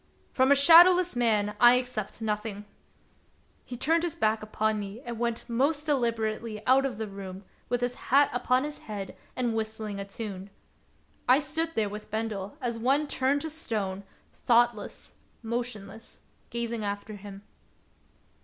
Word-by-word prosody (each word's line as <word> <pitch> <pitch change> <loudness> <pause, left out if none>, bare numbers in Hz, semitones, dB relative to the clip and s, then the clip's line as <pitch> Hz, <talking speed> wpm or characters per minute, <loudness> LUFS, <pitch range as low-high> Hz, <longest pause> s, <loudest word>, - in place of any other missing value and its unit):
" - - -36
From 260 +1 +3
a - - +8
shadowless 345 +4 +7
man 210 -4 +1
I 240 0 +8
accept 245 -4 -3
nothing! 210 -1 -3 0.5
" - - -37
He 245 - -6
turned 325 +6 +2
his 345 -2 -2
back 215 0 +1
upon 215 0 -1
me 200 +2 -6
and 235 -3 -7
went 235 -1 -2
most 280 +6 +1
deliberately 225 -5 -1
out 270 +2 +4
of 255 - -7
the 220 0 -4
room, 195 -1 -8 0.3
with 245 0 0
his 245 0 0 0.2
hat 280 +2 +5
upon 250 +1 +1
his 300 0 -5
head 200 -3 -7 0.2
and 245 -2 0
whistling 220 -2 -4
a - - -3
tune. 200 -1 -7 0.8
I 255 - +8
stood 320 +3 -2
there 215 -2 +1
with 210 +1 -8
Bendel 215 +1 -4
as 235 -2 -2
one 270 +6 +2
turned 280 0 +1
to 320 - -4
stone, 205 - -3 0.3
thoughtless, 235 -3 +1 0.3
motionless, 225 -2 -5 0.3
gazing 235 -1 -3
after 205 +1 -4
him. 200 0 -11
230 Hz, 155 wpm, -28 LUFS, 210-260 Hz, 0.8 s, a